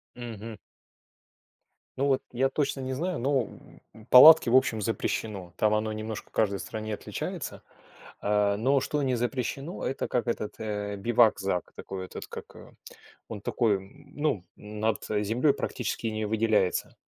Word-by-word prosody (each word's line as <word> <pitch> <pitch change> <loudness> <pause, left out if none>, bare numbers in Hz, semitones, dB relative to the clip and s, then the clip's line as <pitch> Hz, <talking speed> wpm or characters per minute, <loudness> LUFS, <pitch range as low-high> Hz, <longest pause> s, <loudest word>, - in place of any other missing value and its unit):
Мгм. 115 -2 -7 1.4
Ну 140 - +1
вот 135 -2 +2
я 130 +2 +2
точно 140 -1 -1
не 130 0 -3
знаю, 175 +5 -2
но, 135 +1 +2 0.5
м, 110 +1 -15
палатки, 155 +2 +9
в 125 - +5
общем, 110 -4 +2
запрещено. 100 -3 -3
Там 105 0 +3
оно 110 0 0
немножко 110 0 -6
в - - -41
каждой 100 -3 +1
стране 110 +3 -5
отличается. - - -5 0.6
А, 105 0 +2
но 135 +5 +2
что 150 +2 -1
не 130 -2 +1
запрещено, 130 +6 -3
это 135 - -2
как 120 -3 0
этот, 110 -2 -2
э, 105 -1 -3
бивакзак. 100 -4 +2
Такой 95 -1 -6
этот - - -8
как, - - -9
э, - - -13 0.6
он 105 -3 -6
такой, 110 -3 +1
м, 140 +10 -15
ну, 145 - 0
над, 105 +1 -3
э, 105 0 +1
землей 125 +7 +2
практически 120 -4 -3
не 110 -1 -2
выделяется. 105 -3 +1
110 Hz, 155 wpm, -28 LUFS, 105-130 Hz, 1.4 s, палатки